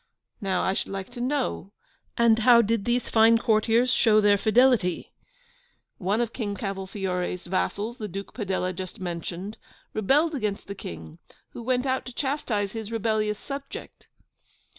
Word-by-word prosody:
Now, 190 Hz, -3 st, 0 dB
I 190 Hz, -, +1 dB
should -, -, -3 dB
like 195 Hz, +3 st, -5 dB
to 245 Hz, -1 st, -7 dB
know, 255 Hz, -, -2 dB, 0.4 s
and 230 Hz, -1 st, +5 dB
how 235 Hz, 0 st, +7 dB
did 220 Hz, -1 st, 0 dB
these 240 Hz, +1 st, 0 dB
fine 225 Hz, +1 st, +5 dB
courtiers 230 Hz, +2 st, +3 dB
show 215 Hz, -2 st, +5 dB
their 205 Hz, -1 st, +5 dB
fidelity? 225 Hz, -4 st, +3 dB, 0.9 s
One 205 Hz, +4 st, +1 dB
of 235 Hz, -1 st, -2 dB
King 205 Hz, -5 st, -3 dB
Cavolfiore's 190 Hz, -2 st, -3 dB
vassals, 205 Hz, +5 st, -2 dB
the 215 Hz, -, -3 dB
Duke 195 Hz, +1 st, -7 dB
Padella 190 Hz, -4 st, -2 dB
just 185 Hz, +4 st, -7 dB
mentioned, 180 Hz, +3 st, -5 dB, 0.3 s
rebelled 285 Hz, -, +2 dB
against 210 Hz, -7 st, -2 dB
the 200 Hz, -, -6 dB
King, 80 Hz, -, -9 dB, 0.3 s
who -, -, -8 dB
went 250 Hz, +2 st, 0 dB
out 260 Hz, -1 st, -1 dB
to 250 Hz, -, -7 dB
chastise 240 Hz, -8 st, -1 dB
his 220 Hz, -1 st, -6 dB
rebellious 215 Hz, -2 st, 0 dB
subject. 275 Hz, +4 st, -8 dB
215 Hz, 150 wpm, -26 LUFS, 195-240 Hz, 0.9 s, how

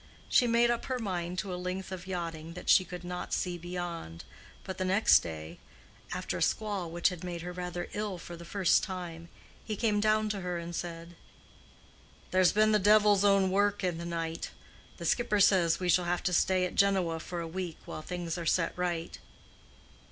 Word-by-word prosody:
She 245 Hz, -, +4 dB
made 235 Hz, +1 st, +4 dB
up 235 Hz, -, -2 dB
her 255 Hz, -, -2 dB
mind 180 Hz, -5 st, -3 dB
to 190 Hz, -1 st, -3 dB
a 180 Hz, -, -4 dB
length 185 Hz, +1 st, -4 dB
of 185 Hz, -1 st, -7 dB
yachting 165 Hz, -3 st, -4 dB
that 180 Hz, -, -7 dB
she 185 Hz, -, +7 dB
could 180 Hz, 0 st, -8 dB
not 180 Hz, 0 st, -5 dB
see 180 Hz, -1 st, -1 dB
beyond; 175 Hz, -, -6 dB, 0.4 s
but 190 Hz, -1 st, -6 dB
the -, -, +1 dB
next 190 Hz, +4 st, +5 dB
day, 80 Hz, -2 st, -7 dB, 0.5 s
after -, -, -3 dB
a -, -, -6 dB
squall 205 Hz, -5 st, 0 dB
which 170 Hz, +2 st, +2 dB
had 180 Hz, -2 st, -8 dB
made 175 Hz, -2 st, -5 dB
her 180 Hz, -, -5 dB
rather 180 Hz, -1 st, -4 dB
ill 210 Hz, -3 st, -3 dB
for 170 Hz, 0 st, -9 dB
the 170 Hz, -, -10 dB
first 185 Hz, +1 st, +2 dB
time, 170 Hz, -3 st, -6 dB, 0.3 s
he 215 Hz, -, -3 dB
came 210 Hz, -1 st, +1 dB
down 215 Hz, +1 st, +2 dB
to 205 Hz, -2 st, -3 dB
her 180 Hz, -1 st, -2 dB
and 170 Hz, 0 st, -6 dB
said, 170 Hz, 0 st, -6 dB, 1.2 s
"There's 185 Hz, -1 st, +5 dB
been 215 Hz, +1 st, +4 dB
the 210 Hz, -, +4 dB
devil's 205 Hz, 0 st, +5 dB
own 195 Hz, -2 st, +4 dB
work 205 Hz, +1 st, +2 dB
in 175 Hz, -3 st, -1 dB
the 170 Hz, -, -5 dB
night. 165 Hz, -1 st, -3 dB, 0.5 s
The -, -, -6 dB
skipper 215 Hz, -4 st, +2 dB
says 180 Hz, -4 st, +4 dB
we 180 Hz, -, -2 dB
shall 175 Hz, +1 st, +3 dB
have 175 Hz, 0 st, -1 dB
to 180 Hz, -, 0 dB
stay 185 Hz, +1 st, +3 dB
at 180 Hz, -, -4 dB
Genoa 190 Hz, -5 st, +2 dB
for 175 Hz, +2 st, -5 dB
a 165 Hz, -, -4 dB
week 175 Hz, -1 st, -5 dB
while -, -, -6 dB
things 175 Hz, 0 st, -4 dB
are 170 Hz, -, -5 dB
set 165 Hz, +1 st, +2 dB
right." 175 Hz, -2 st, -3 dB
180 Hz, 200 wpm, -30 LUFS, 170-200 Hz, 1.2 s, she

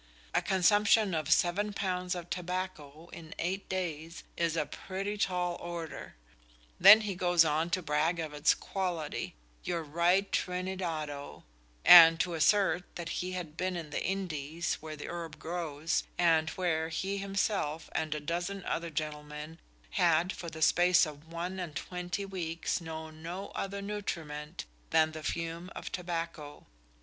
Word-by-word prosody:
A -, -, +3 dB
consumption 205 Hz, +2 st, +4 dB
of 155 Hz, -1 st, -1 dB
seven 200 Hz, +5 st, +2 dB
pounds 180 Hz, -2 st, -1 dB
of 175 Hz, -1 st, -6 dB
tobacco 175 Hz, -4 st, -4 dB
in 160 Hz, -2 st, -9 dB
eight 190 Hz, +3 st, -3 dB
days 165 Hz, -3 st, -4 dB
is 170 Hz, -1 st, 0 dB
a 150 Hz, -, +1 dB
pretty 195 Hz, +5 st, -4 dB
"tall 180 Hz, -4 st, 0 dB
order"! 170 Hz, -2 st, -7 dB, 0.6 s
Then 205 Hz, +4 st, +10 dB
he 210 Hz, -2 st, -2 dB
goes 175 Hz, -2 st, +4 dB
on 160 Hz, +2 st, +1 dB
to 185 Hz, +1 st, -1 dB
brag 155 Hz, +3 st, +1 dB
of 155 Hz, -2 st, -4 dB
its 150 Hz, +1 st, +3 dB
quality 180 Hz, -6 st, -3 dB, 0.3 s
your 170 Hz, -2 st, -2 dB
right 175 Hz, +6 st, +2 dB
Trinidado 175 Hz, -6 st, -3 dB, 0.4 s
and 165 Hz, -2 st, +10 dB
to 180 Hz, -1 st, 0 dB
assert 180 Hz, +2 st, +2 dB
that 170 Hz, -1 st, -5 dB
he 180 Hz, +2 st, -3 dB
had 170 Hz, -4 st, -5 dB
been 185 Hz, +2 st, -1 dB
in 165 Hz, -4 st, -6 dB
the -, -, -2 dB
Indies, 170 Hz, -4 st, -2 dB
where 155 Hz, 0 st, -6 dB
the 150 Hz, -, -7 dB
herb 165 Hz, -3 st, -6 dB
grows, 165 Hz, -2 st, -2 dB, 0.2 s
and 165 Hz, -2 st, +3 dB
where 160 Hz, -3 st, -1 dB
he 195 Hz, +4 st, -2 dB
himself 195 Hz, -5 st, -1 dB
and 155 Hz, -1 st, -1 dB
a -, -, -2 dB
dozen 175 Hz, +5 st, -3 dB
other 170 Hz, 0 st, -2 dB
gentlemen 150 Hz, +1 st, -5 dB, 0.3 s
had 175 Hz, 0 st, +3 dB
for 170 Hz, -, -6 dB
the 160 Hz, -1 st, -3 dB
space 175 Hz, +2 st, +5 dB
of 150 Hz, 0 st, -10 dB
one 175 Hz, +3 st, -4 dB
and 170 Hz, -4 st, -5 dB
twenty 180 Hz, +4 st, -4 dB
weeks 170 Hz, -3 st, -3 dB
known 160 Hz, -1 st, -7 dB
no 180 Hz, +4 st, -5 dB
other 200 Hz, 0 st, -4 dB
nutriment 165 Hz, -6 st, -5 dB, 0.2 s
than 160 Hz, 0 st, +4 dB
the 155 Hz, 0 st, -7 dB
fume 165 Hz, +3 st, -3 dB
of -, -, -6 dB
tobacco. 165 Hz, -4 st, -5 dB
170 Hz, 150 wpm, -31 LUFS, 160-185 Hz, 0.6 s, Then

